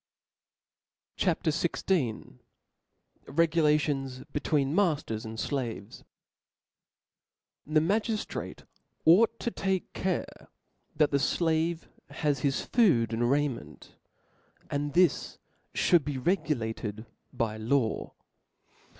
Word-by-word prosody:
CHAP. 180 -2 0
XVI. 155 - -1 0.9
Regulations 150 -4 +1
between 145 -1 0
Makers 150 - 0
and 110 0 -6
Slaves. 120 -8 -4 1.7
T^HE 155 0 +3
magiftrati 215 +3 -2 0.4
ought 225 +8 +5
to 235 - -2
take 190 -3 -2
care 185 -1 -3 0.5
that 150 -2 +3
the 140 - +3
^ 140 - 0
flave 165 0 0 0.2
has 145 -4 -1
his 140 0 0
food 130 - +3
and 120 +1 +1
raiment; 140 -2 -2 0.8
and 145 0 -2
this 180 +1 +2 0.4
fhould 175 -4 +4
be 145 -1 -3
regulated 120 - -2 0.3
by 110 -2 -2
law. 115 +1 0
145 Hz, 90 wpm, -29 LUFS, 125-170 Hz, 1.7 s, ought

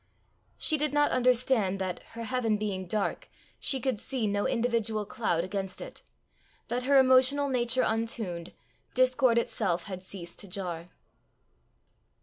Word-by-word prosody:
She 310 - +3
did 300 0 0
not 295 0 +3
understand 250 -5 +2
that, 185 -2 -3
her 230 0 -6
heaven 230 -3 0
being 195 -3 -3
dark, 210 +2 -2 0.3
she 270 - +2
could 255 -3 -1
see 255 -2 -2
no 205 0 0
individual 225 -3 0
cloud 175 -7 -1
against 190 0 -4
it, - - -9 0.7
that, 245 +2 -1
her 280 - +6
emotional 265 +2 +5
nature 255 0 +2
untuned, 220 -6 -2 0.4
discord 255 -1 +3
itself 210 -7 0
had 185 -1 -7
ceased 185 -2 -7
to 200 - -9
jar. 180 -3 -5
225 Hz, 135 wpm, -29 LUFS, 195-255 Hz, 0.7 s, her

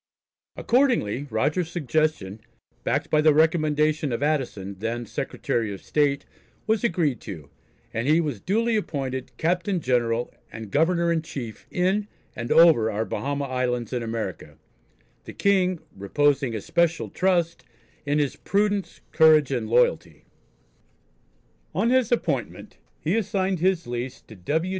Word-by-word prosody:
Accordingly, 235 - +1
Rogers's 150 +9 0
suggestion, 150 - -1 0.4
backed - - -1
by 155 - +4
the 155 -1 +5
recommendation 155 -2 +2
of 120 +4 -2
Addison, 120 -10 -2
then 115 +3 -3
Secretary 115 0 -2
of 100 - -6
State, 145 -2 +1 0.4
was 220 0 +1
agreed 165 - 0
to, 80 -9 -9 0.4
and 115 +3 -2
he 155 +3 +4
was 145 -11 -2
duly 225 +4 +1
appointed 135 - -3
"Captain 175 +3 0
General 120 -3 0 0.2
and 110 -3 -8
Governor 170 +3 +2
in 165 -1 +1
Chief 125 -8 -8
in 190 +3 0 0.3
and 120 0 -5
over 160 -10 +6
our 110 +1 -2
Bahama 140 +3 -3
Islands 125 -2 -2
in 125 - -1
America," 115 -1 -5 0.7
the - - -9
King 185 -3 +2 0.2
"reposing 135 +5 +1
especial 170 - 0
trust" 175 -3 0 0.4
in 145 +1 0
his 145 -3 0
"Prudence, 205 0 -1
Courage 155 -3 +5
and 120 -5 -2
Loyalty." 120 +2 +1 1.5
On 220 +7 +2
his 255 -3 +2
appointment 150 - -2 0.2
he 170 +6 0
assigned 190 -4 0
his 180 -1 +1
lease 120 +2 -5
to 110 - -14
W. 155 - -1
150 Hz, 135 wpm, -25 LUFS, 120-175 Hz, 1.5 s, over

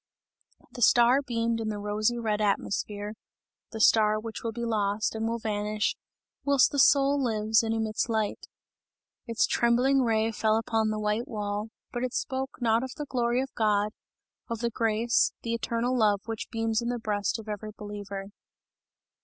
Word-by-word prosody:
The 245 - -9
star 240 +4 +5
beamed 230 -3 -1
in 220 -1 -2
the 210 - -3
rosy 210 +3 0
red 215 -2 -1
atmosphere, 205 0 -1 0.6
the 220 - -6
star 215 -1 +4
which 225 0 -7
will 230 - -2
be 235 +1 -4
lost 210 -1 0
and 220 0 -2
will 230 +1 -1
vanish, 210 -1 -1 0.5
whilst 280 -2 +4
the 285 - -1
soul 280 +1 +5
lives 220 -2 +2
and 225 -1 -2
emits 220 +1 -1
light. 220 -2 -1 0.8
Its 230 -1 +2
trembling 250 +3 +3
ray 225 -2 +1
fell 220 0 +1
upon 225 -1 0
the 215 - -2
white 210 +2 -1
wall, 210 0 -3 0.2
but 240 - -3
it 255 - -2
spoke 265 0 -3
not 230 -1 +2
of 260 0 -6
the 295 - -4
glory 245 -1 0
of 270 - -9
God, 210 -1 +1 0.6
of 230 - -2
the 235 +1 -2
grace, 225 +1 +2
the 230 - -2
eternal 235 +2 -1
love 210 -4 +3
which 225 -1 -5
beams 225 -1 0
in 235 - -2
the 245 - -1
breast 210 -2 -1
of 225 -1 -10
every 210 0 -5
believer. 205 -1 -7
225 Hz, 170 wpm, -28 LUFS, 210-235 Hz, 0.8 s, star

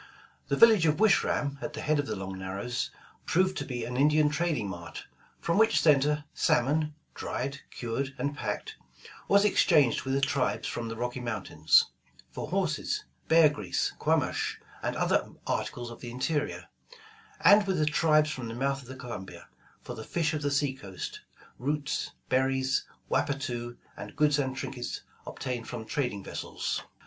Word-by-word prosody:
Tlie 140 - +1
village 220 -8 +7
of 155 +2 +2
Wish 220 -2 +5
ram 140 -1 -1
at 150 - -4
the 150 - -5
head 150 -1 +1
of 145 - -1
the - - -2
Long 95 0 -5
Narrows, 100 +7 -3 0.4
proved 185 +2 +2
to - - -3
be 125 -2 -4
an 125 +1 -4
Indian 150 +2 +4
trading 150 -8 0
mart, 85 -3 -7 0.3
from 170 +4 +1
which 220 0 +5
center, 150 -1 +4
salmon, 150 +5 +2
— - - -42
dried, 140 +1 -4
cured, 130 +3 -3
and 145 0 -2
packed, - - -4 0.2
— - - -17
was 200 +1 +5
exchanged 155 - +4
with 135 0 -1
the - - +3
tribes 140 -1 0
from 120 -1 -3
the 115 - -4
Rocky 120 +2 -3
Mountains, 110 -10 +2 0.4
for - - -5
horses, - - -1 0.2
bear 160 -1 +7
grease, 145 0 -1
quamash, - - +1 0.2
and - - -2
other - - +1
articles 120 -1 -2
of 115 - -11
the 120 - -6
interior; 145 +4 -2 0.7
and 205 0 +6
with 190 -2 +1
the 155 - +3
tribes 155 0 +3
from 125 -5 -5
the 115 - -5
mouth 135 +2 0
of 125 - -15
the 130 - -8
Columbia, 120 -7 -8 0.3
for - - -6
the 110 - -7
fish 165 +3 0
of 150 - -2
the 145 - 0
sea 140 -1 +1
coast, 100 -8 -7 0.4
roots, 145 +2 -1 0.2
berries, 130 0 +1 0.2
wappatoo, 120 -4 -1 0.2
and - - -9
goods 150 -1 +3
and 130 -2 -1
trinkets 125 -2 -4 0.3
obtained 125 -3 -4
from 115 -2 -6
trad 135 +2 0
ing 100 -3 -7
vessels. - - -3
140 Hz, 175 wpm, -29 LUFS, 120-150 Hz, 0.7 s, village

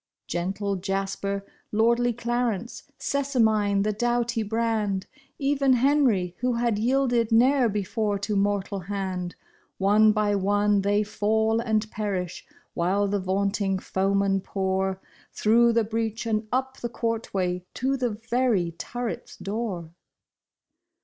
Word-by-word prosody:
" - - -62
Gentle 195 +3 -2
Jasper, 195 +1 -2 0.3
lordly 235 +3 +3
Clarence, 240 0 -2
Sessamine 220 -8 +1
the 215 0 0
dough 240 +2 +1
ty 235 -1 -2
brand, 215 -3 -1 0.3
Even 275 -1 +2
Henri 245 -9 +2
who 250 0 +1
had 235 -3 0
yielded 245 -1 +2
ne'er 250 +2 +4
before 205 +1 -1
to 205 +1 -2
mortal 200 0 0
hand; 185 -1 -4 0.4
One 210 +3 +5
by 210 -1 +1
one 205 +1 +2
they 205 +2 +2
fall 220 +2 +1
and 220 -2 0
perish, 195 -5 -3 0.3
while 195 +4 +1
the 200 0 0
vaunting 195 +1 0
foemen 195 +1 +1
pour 190 0 -1 0.3
Through 235 +2 +4
the 230 0 +3
breach 225 +1 -2
and 215 -1 -1
up 260 +1 -1
the 240 - -4
courtway 200 -6 -2
to 265 +2 0
the 250 -2 0
very 225 -4 0
turret's 235 +8 -5
door. 195 -6 -4
215 Hz, 125 wpm, -26 LUFS, 195-235 Hz, 0.4 s, One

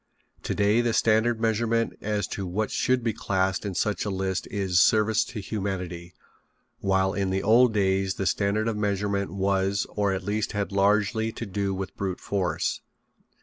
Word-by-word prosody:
Today 105 +3 +2
the 120 -1 0
standard 115 +2 +3
of 110 - -12
measurement 115 +1 +1
as 105 -2 -1
to 95 -2 -4
what 105 +4 -2
should 125 -1 +1
be 115 -2 0
classed 95 0 -1
in 95 - -4
such 105 -1 0
a 105 - -2
list 95 -1 -2
is 95 -3 +2
service 110 0 +3
to 115 - -7
humanity, 90 -4 -4 0.6
while 95 0 +1
in 100 -2 -1
the 95 +1 -1
old 120 +3 +5
days 95 -2 +1
the 95 - -3
standard 100 +3 +1
of 115 - -1
measurement 100 -1 -1
was 100 0 0
or 100 -1 0
at 95 0 -2
least 105 +3 -2
had 100 -1 -2
largely 105 +3 +2
to 115 - -5
do 100 0 -2
with 95 -1 -5
brute 95 -2 -3
force. 95 -3 -1
100 Hz, 175 wpm, -26 LUFS, 95-110 Hz, 0.6 s, old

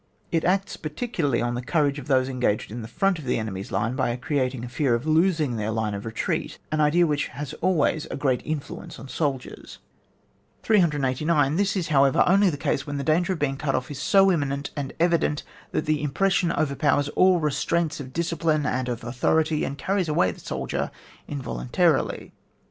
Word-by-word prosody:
It 165 -1 +1
acts 195 +2 0
particularly 155 - -1
on 120 0 -1
the 120 - -3
courage 145 +1 +1
of 130 - -10
those 130 -2 +3
engaged 125 -6 -1
in 120 +2 -5
the 110 - -7
front 190 +9 +1
of 150 - -9
the 125 - +1
enemy's 100 -3 -5
line 115 +6 0
by 120 - 0
creating 130 -3 -2
a - - -6
fear 130 0 +1
of 120 - -4
losing 155 -5 +2
their 105 0 -2
line 110 -1 -1
of 100 +2 -5
retreat, 110 - -2
an 155 0 +1
idea 160 +4 +4
which 150 -2 0
has 145 0 -7
always 165 -3 +1
a - - -4
great 135 -3 0
influence 155 -2 -5
on 135 - -10
soldiers. 135 -2 -4 0.9
389. 150 - +2
This 200 +2 +1
is, 180 -5 -2
however, 135 -2 +4
only 195 +1 +5
the 145 - -3
case 135 - -1
when 145 0 -3
the 140 - -2
danger 170 +6 +2
of - - -4
being 135 -3 -1
cut 140 -1 -1
off 130 - -3
is 140 -1 -6
so 195 +2 +5
imminent 140 -4 -1
and 140 -2 -3
evident, 170 -3 +2 0.3
that - - -1
the 150 -1 0
impres 190 +7 +1
sion 180 -2 +2
overpowers 145 -1 +1
all 185 +3 +4
restraints 155 +2 0
of 130 -2 -7
discipline 165 -1 0
and 130 -2 -1
of 120 -1 -4
authority, 155 +6 +1
and 140 - -3
carries 185 +3 -1
away 95 -12 +2
the - - -12
soldier - - -3 0.4
involuntarily. 65 - 0
145 Hz, 195 wpm, -25 LUFS, 130-165 Hz, 0.9 s, only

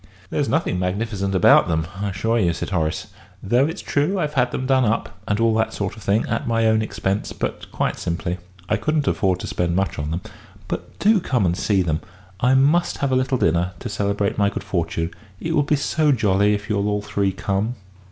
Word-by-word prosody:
"There's 145 -2 0
nothing 160 - 0
magnificent 100 +1 -1
about 95 - +6
them, 80 -2 0 0.2
I 100 - -1
assure 110 +5 0
you," 85 -5 +2
said 85 - -5
Horace. 80 -4 -1 0.4
"Though 125 +7 +3
it's 165 +5 -5
true 150 +8 +1
I've 150 -4 -1
had 125 -3 +2
them 130 - -3
done 130 -1 +3
up, 115 0 -1
and 100 +1 0
all 115 -1 +3
that 110 0 +1
sort 100 0 -3
of 110 - -12
thing, 100 +3 +1
at - - -2
my 115 -1 +2
own 110 0 +3
expense 100 -1 -2
but - - -4
quite - - -1
simply. 85 +1 -2 0.3
I 110 - +1
couldn't 150 +5 0
afford 95 -2 +1
to - - -5
spend 85 -1 -1
much 95 -3 0
on 75 0 -2
them. 85 +3 -2 0.5
But - - -5
do 215 0 +4
come 125 - 0
and 85 0 +1
see 95 0 +1
them. 80 -2 -1 0.4
I 125 +4 +4
must 150 +6 +3
have 140 -1 -1
a - - +3
little 130 +1 +1
dinner, 85 -1 +1
to - - -6
celebrate 100 0 -1
my 100 0 +4
good - - -5
fortune 85 -1 -2 0.3
it 165 - -2
will 150 - +4
be 145 +1 +2
so 150 +1 +1
jolly 105 -4 +3
if 100 0 -6
you'll 105 -1 0
all 105 0 -1
three 100 -1 0
come." 100 +5 -1
105 Hz, 220 wpm, -22 LUFS, 95-130 Hz, 0.5 s, about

